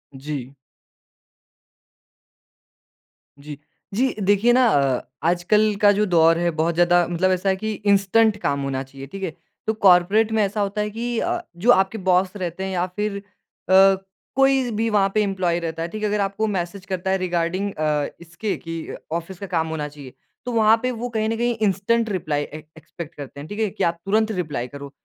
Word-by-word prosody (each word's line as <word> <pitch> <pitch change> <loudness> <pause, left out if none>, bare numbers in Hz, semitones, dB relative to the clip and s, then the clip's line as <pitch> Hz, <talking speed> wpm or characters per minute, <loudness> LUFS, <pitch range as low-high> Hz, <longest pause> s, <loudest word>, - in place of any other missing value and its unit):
जी। 135 -1 -6 2.9
जी। 145 0 -9 0.4
जी 255 +5 +1
देखिए 205 +4 +3
ना 255 +1 +5
अ 140 - +2 0.3
आजकल 210 +5 +2
का 205 - +7
जो 210 +1 +2
दौर 165 -2 +4
है 175 0 +1
बहुत 160 +1 0
ज़्यादा 175 0 +4
मतलब 180 +2 +1
ऐसा 185 +1 0
है 190 - +2
कि 215 +3 -3
इंस्टेंट 205 +2 +3
काम 140 0 0
होना 135 -1 -2
चाहिए। 135 +1 -11
ठीक 195 +6 -8
है? 165 -4 -3 0.3
तो 220 - +2
कॉर्पोरेट 200 +2 +4
में 220 -1 +2
ऐसा 205 +1 -1
होता 200 +1 -1
है 210 - -1
कि 235 +2 -3
अ, 350 0 -1 0.2
जो 235 +8 +4
आपके 195 +2 +3
बॉस 185 +2 +2
रहते 180 -1 -4
हैं 190 - -3
या 180 0 0
फ़िर 210 -1 -2
अ, 195 -1 +2 0.4
कोई 270 -2 +3
भी 225 +2 0
वहाँ 200 -2 +3
पे 215 - +3
एम्प्लॉयी 185 -3 0
रहता 165 -1 -4
है। 165 - -1
ठीक 215 +4 -6
है? 210 - +1
अगर 210 0 0
आपको 200 +3 -1
मैसेज 185 0 -3
करता 190 0 -2
है 190 - +2
रिगार्डिंग 185 +2 -1
अ, 150 -2 0
इसके 170 +5 -4
कि 165 -1 -6 0.3
ऑफ़िस 170 +2 -4
का 200 - -5
काम 160 0 +1
होना 160 -2 -3
चाहिए। 140 -3 -12 0.3
तो 245 - -3
वहाँ 220 0 +5
पे 255 - +1
वो 245 - -3
कहीं 220 0 0
न 225 - -1
कहीं 240 0 0
इंस्टेंट 220 +4 +1
रिप्लाई 155 -6 -1
ए 155 +1 -9
एक्सपेक्ट 165 +1 -10
करते 140 -1 -9
हैं। 145 - -8
ठीक 205 +2 -6
है? 215 -2 +1
कि - - -4
आप 170 0 +1
तुरंत 220 +2 +2
रिप्लाई 145 -7 -4
करो। 140 +1 -9
190 Hz, 195 wpm, -22 LUFS, 165-210 Hz, 2.9 s, का